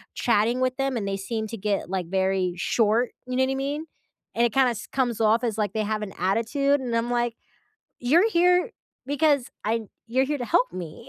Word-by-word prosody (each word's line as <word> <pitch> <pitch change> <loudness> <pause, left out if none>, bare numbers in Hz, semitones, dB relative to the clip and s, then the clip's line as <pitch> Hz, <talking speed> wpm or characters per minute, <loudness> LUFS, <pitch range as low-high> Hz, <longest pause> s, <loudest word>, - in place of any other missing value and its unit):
chatting 235 +2 +2
with 255 0 0
them 270 -1 0
and 205 -3 -3
they 195 0 -1
seem 220 +3 -3
to 230 - -6
get, 200 -2 -2
like, 185 -1 -2
very 190 -1 0
short, 225 +5 +1 0.2
you 255 - -3
know 260 - +3
what 260 - 0
I - - -1
mean? 285 +3 -3 0.5
And 235 - +3
it 235 - -1
kinda 265 -2 +4
s 230 0 -7
comes 245 -4 -1
off 225 +3 +3
as 225 -3 -1
like 210 -2 -1
they 220 - 0
have 215 0 -2
an 195 - -7
attitude, 230 - +1
and 245 -3 -3
I'm, 230 +1 0
like, 240 -1 0 0.7
"You're 330 - +4
here 360 +3 +3 0.4
because 285 -2 +2
I 225 +2 0 0.2
you're 255 +3 +2
here 295 +2 -1
to 245 - -3
help 245 +2 +2
me, 180 - -8
235 Hz, 215 wpm, -25 LUFS, 210-265 Hz, 0.7 s, kinda